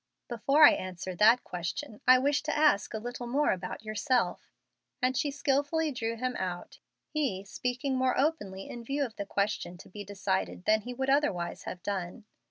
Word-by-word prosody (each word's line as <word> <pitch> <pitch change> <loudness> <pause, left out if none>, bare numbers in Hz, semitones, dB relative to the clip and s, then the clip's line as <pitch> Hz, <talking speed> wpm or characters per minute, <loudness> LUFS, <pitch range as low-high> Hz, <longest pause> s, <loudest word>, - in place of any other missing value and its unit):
"Before 275 +6 +3
I - - +9
answer 185 0 -4
that 220 +7 +5
question 185 - -5
I 255 0 +9
wish 280 +3 +2
to 305 0 -2
ask 295 -9 +3
a - - -3
little 245 +2 -6
more 280 +5 +2
about 185 +3 -4
yourself;" 215 -2 0 0.5
and 255 0 +1
she 290 +3 +1
skilfully 290 +3 0
drew 230 -3 -2
him 250 +2 -2
out, 180 -2 -5 0.3
he 255 -11 -1
speaking 250 +5 -2
more 255 0 +1
openly 205 -11 -1
in 240 - -7
view 280 +4 -1
of 230 - -9
the 200 - -4
question 200 -3 -1
to - - -14
be 205 +2 -7
decided 195 -2 -2
than 215 0 +4
he 250 +3 -6
would 265 +1 0
otherwise 270 -12 0
have 180 - -7
done. 195 +2 -4
240 Hz, 180 wpm, -30 LUFS, 195-275 Hz, 0.5 s, I